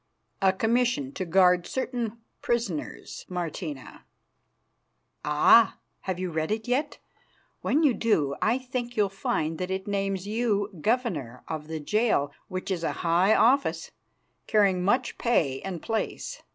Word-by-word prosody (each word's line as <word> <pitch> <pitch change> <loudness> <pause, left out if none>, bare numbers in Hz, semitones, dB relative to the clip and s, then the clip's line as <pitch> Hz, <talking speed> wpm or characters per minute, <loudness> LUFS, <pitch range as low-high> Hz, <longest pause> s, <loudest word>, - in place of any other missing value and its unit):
"A 190 -1 +5
commission 225 - +1
to 185 - -4
guard 180 0 +4
certain 240 -4 -3 0.2
prisoners, 230 -10 -3
Martina." 165 -5 -5 1.2
"Ah! 150 +9 +5 0.2
Have 185 -2 -3
you 185 -1 -3
read 160 +3 -2
it 220 +1 -2
yet? 280 +5 0 0.6
When 310 +3 +2
you 285 -5 +5
do, 155 -13 +1
I 230 +3 +3
think 250 -2 -5
you'll 205 -2 +3
find 160 -4 -2
that 180 0 -3
it 190 0 -3
names 195 -2 -1
you 210 -2 0
Governor 165 - -1
of 155 -1 -5
the 160 0 -4
jail, 210 -4 +1 0.2
which 185 +1 -4
is 175 -3 -2
a - - 0
high 180 +5 +4
office, 265 +5 +2 0.6
carrying 195 -4 +3
much 245 +6 +1
pay 145 - +1
and 185 -4 -6
place. 225 - -3
195 Hz, 140 wpm, -27 LUFS, 170-235 Hz, 1.2 s, A